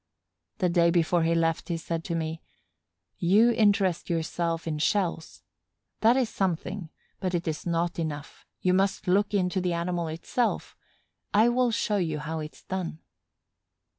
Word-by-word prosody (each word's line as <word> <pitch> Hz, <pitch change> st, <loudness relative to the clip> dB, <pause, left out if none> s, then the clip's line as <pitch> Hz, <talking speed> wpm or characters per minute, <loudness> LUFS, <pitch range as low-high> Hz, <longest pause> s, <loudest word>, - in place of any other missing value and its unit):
The 180 Hz, -, +2 dB
day 170 Hz, -1 st, +4 dB
before 170 Hz, 0 st, +2 dB
he 165 Hz, +1 st, +2 dB
left 165 Hz, 0 st, +1 dB
he 170 Hz, -, 0 dB
said 165 Hz, 0 st, -4 dB
to 170 Hz, -, -2 dB
me: 160 Hz, 0 st, -3 dB, 0.8 s
"You 210 Hz, +7 st, +5 dB
interest 200 Hz, -6 st, +2 dB
yourself 165 Hz, 0 st, -1 dB
in 155 Hz, -2 st, -2 dB
shells. 175 Hz, -2 st, -1 dB, 0.6 s
That 230 Hz, +3 st, +5 dB
is 255 Hz, -3 st, +2 dB
something, 185 Hz, -2 st, -2 dB, 0.3 s
but 185 Hz, -1 st, -1 dB
it 170 Hz, -1 st, -2 dB
is 155 Hz, +2 st, -3 dB
not 170 Hz, 0 st, 0 dB
enough. 150 Hz, -3 st, -5 dB
You 180 Hz, -, +3 dB
must 190 Hz, +1 st, +1 dB
look 200 Hz, +3 st, +3 dB
into 185 Hz, -1 st, +1 dB
the 180 Hz, -1 st, 0 dB
animal 170 Hz, 0 st, -1 dB
itself. 170 Hz, +9 st, -2 dB, 0.6 s
I 220 Hz, +3 st, +6 dB
will 250 Hz, 0 st, +2 dB
show 215 Hz, -2 st, 0 dB
you 165 Hz, -5 st, -1 dB
how 160 Hz, +2 st, -4 dB
it's 155 Hz, 0 st, -8 dB
done." 185 Hz, -4 st, -4 dB
175 Hz, 155 wpm, -27 LUFS, 165-195 Hz, 0.8 s, I